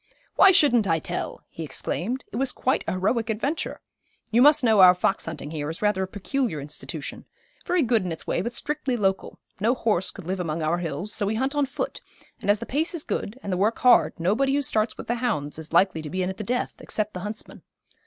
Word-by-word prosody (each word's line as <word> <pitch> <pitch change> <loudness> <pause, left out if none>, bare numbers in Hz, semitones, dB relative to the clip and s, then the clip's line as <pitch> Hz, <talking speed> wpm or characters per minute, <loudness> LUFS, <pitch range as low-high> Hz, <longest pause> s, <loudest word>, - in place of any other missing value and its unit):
'Why 390 - +8
shouldn't 280 - +4
I 165 - +3
tell?' 160 - -4
he - - -10
exclaimed. 225 - -3
'It - - -7
was 265 0 +1
quite 260 - 0
a - - 0
heroic 215 +5 0
adventure. 270 +9 -2 0.5
You 235 +2 +4
must 290 +1 +6
know 220 -3 +4
our 180 -1 +9
fox 195 +1 0
hunting 150 -2 -6
here 150 -2 -3
is 165 +6 -5
rather 210 -2 +2
a 190 - -1
peculiar 210 - -2
institution, 145 +1 -6 0.4
very 355 -3 +3
good 230 -4 +2
in 180 - -3
its 160 - -5
way, - - 0
but 235 +5 -3
strictly 290 -4 -2
local. 195 -3 -1 0.2
No 230 +5 +2
horse 205 -7 0
could 195 - -10
live 185 +2 -2
among 165 -2 -2
our 165 +3 +1
hills, 175 +5 -4
so 205 - 0
we 215 - 0
hunt 265 +5 0
on 290 -2 +1
foot, 280 +3 -4 0.4
and - - -3
as 205 - +5
the 235 - -6
pace 315 +8 -1
is 320 - -3
good, 215 - -3
and 200 - -2
the - - 0
work 210 +5 +1
hard, 250 -7 +4
nobody 240 +11 +2
who 285 - +1
starts 220 -6 0
with - - -7
the 240 - -1
hounds 155 - -1
is 160 0 -7
likely 170 -1 +3
to 155 - -7
be 185 +2 -1
in 180 - -1
at 190 - -10
the - - -4
death, 245 +4 -1
except 215 -1 -2
the 180 - -5
huntsmen. 210 +3 -6
210 Hz, 235 wpm, -25 LUFS, 180-250 Hz, 0.5 s, our